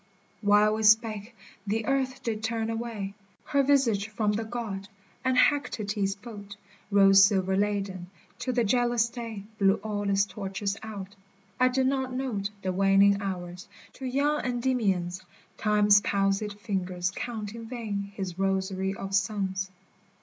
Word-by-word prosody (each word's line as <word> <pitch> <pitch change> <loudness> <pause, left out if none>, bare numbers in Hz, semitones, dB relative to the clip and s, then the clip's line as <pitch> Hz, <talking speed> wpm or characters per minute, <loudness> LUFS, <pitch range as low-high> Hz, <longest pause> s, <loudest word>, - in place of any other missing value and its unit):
while 210 0 +4
we 220 - -2
spake 220 +1 +3 0.3
the 220 +2 -1
earth 265 -2 -1
did 220 -2 -3
turn 225 0 -1
away 225 -4 -4 0.3
Her 280 -1 +2
visage 260 -8 +2
from 215 -1 0
the 215 +2 -1
God, 220 -4 -5 0.4
and 260 -1 +1
Hecate's 210 -8 +1
boat 205 -2 -10 0.3
Rose 195 -1 +7
silver 190 -2 +3
laden, 195 -3 -1 0.3
till 255 -1 -2
the 240 - +3
jealous 240 +1 +2
day 230 -4 -6 0.2
Blew 195 -1 +5
all 205 -2 -2
its 200 0 +3
torches 195 0 -4
out: 205 -2 -8 0.4
I 255 - +5
did 260 +1 +1
not 265 -1 0
note 230 -7 -2
The 185 -1 -1
waning 195 +1 +4
hours, 180 -2 -5 0.3
to 265 - -6
young 285 +4 +1
Endymions 220 -8 0 0.4
Time's 210 -1 +5
palsied 200 +1 0
fingers 185 -3 -2
count 220 -3 -5
in 230 0 -8
vain 210 -5 -4
his 190 -3 -5
rosary 190 0 0
of 195 0 -6
suns 195 -1 0
205 Hz, 140 wpm, -28 LUFS, 195-235 Hz, 0.4 s, Rose